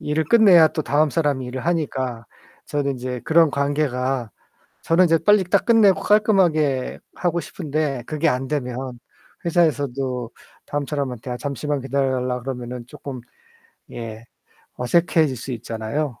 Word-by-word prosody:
일을 150 +2 -1
끝내야 185 -5 +6
또 155 - -3
다음 150 +2 +2
사람이 145 -4 0
일을 125 +1 -6
하니까 130 -8 -2 0.4
저는 140 -1 -1
인제 125 -1 -5
그런 165 -1 +4
관계가 135 -4 -1 0.5
저는 175 +3 +4
이제 165 0 +4
빨리 205 +3 +4
딱 180 - +1
끝내고 220 -5 +5
깔끔하게 170 - +2 0.2
하고 175 -1 0
싶은데 150 -5 -3
그게 155 +3 -1
안 130 0 -2
되면 130 -3 -4 0.5
회사에서도 135 -7 0 0.4
다음 145 -1 -3
사람한테 130 -4 -4
아 125 - -3
잠시만 145 +2 -3
기다려 135 0 0
달라 125 0 -2
그러면은 125 -1 -6
쪼끔 135 -2 -8 0.7
예 115 -1 -7 0.5
어색해질 155 +1 +2
수 130 +3 -6
있잖아요. 115 +3 -4
140 Hz, 315 characters per minute, -22 LUFS, 125-160 Hz, 0.7 s, 끝내야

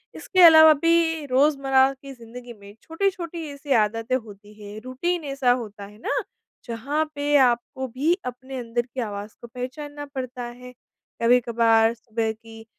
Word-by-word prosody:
इसके 370 - 0
अलावा 315 -1 +9
भी 325 0 +1
रोज़मर्रा 270 -1 +3
की 275 0 -12
ज़िंदगी 240 0 -11
में 200 -2 -15
छोटी-छोटी 340 -1 -3
ऐसी 280 0 -9
आदतें 225 +2 +1
होती 210 -4 -8
हैं, 205 +1 -9
रूटीन 335 +7 -2
ऐसा 275 -3 +1
होता 215 -5 -4
है 205 +1 -15
ना? 225 - -2 0.4
जहाँ 265 +6 -2
पे 290 0 0
आपको 255 +1 +1
भी 275 +8 0
अपने 260 +2 -7
अंदर 240 -1 -2
की 245 +2 -10
आवाज़ 205 -1 -6
को 235 - -9
पहचानना 290 +5 -7
पड़ता 255 -1 -5
है। 250 +1 -10 0.5
कभी-कभार 230 -1 +3
सुबह 225 -1 -3
की 225 0 -13
250 Hz, 150 wpm, -23 LUFS, 230-285 Hz, 0.5 s, अलावा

